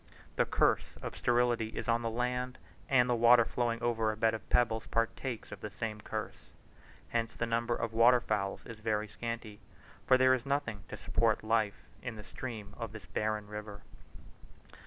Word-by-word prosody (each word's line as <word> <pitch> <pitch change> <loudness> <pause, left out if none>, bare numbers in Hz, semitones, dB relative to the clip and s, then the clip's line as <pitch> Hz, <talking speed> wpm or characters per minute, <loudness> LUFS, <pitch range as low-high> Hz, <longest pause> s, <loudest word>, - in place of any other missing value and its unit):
The - - +3
curse - - +2
of - - -5
sterility 120 -2 +2
is - - -3
on 115 0 +2
the 115 - -1
land, 125 +2 -2 0.3
and 125 -2 +5
the 125 - +2
water 120 0 +6
flowing 115 -1 -1
over 115 -2 +1
a 110 - -7
bed 110 0 +3
of 110 - -6
pebbles 115 -2 +2
partakes 115 +1 -2
of - - -8
the 105 - -4
same 105 +1 -4
curse. - - -6 0.6
Hence 115 -1 -1
the 120 - -1
number 115 +1 0
of 115 -1 -3
water 120 +2 +6
fowls 100 -4 -2
is 115 -2 -9
very 110 -1 0
scanty; 115 -2 -6 0.5
for 130 - +7
there 130 0 +5
is 125 -2 0
nothing 140 -7 -2
to - - -6
support 110 -2 +1
life 110 -2 +1 0.2
in 125 -2 -5
the 105 - -9
stream 110 -3 -7
of 115 -2 -5
this 105 -3 -9
barren 105 +2 -1
river. 105 0 -8
115 Hz, 180 wpm, -32 LUFS, 110-120 Hz, 0.6 s, for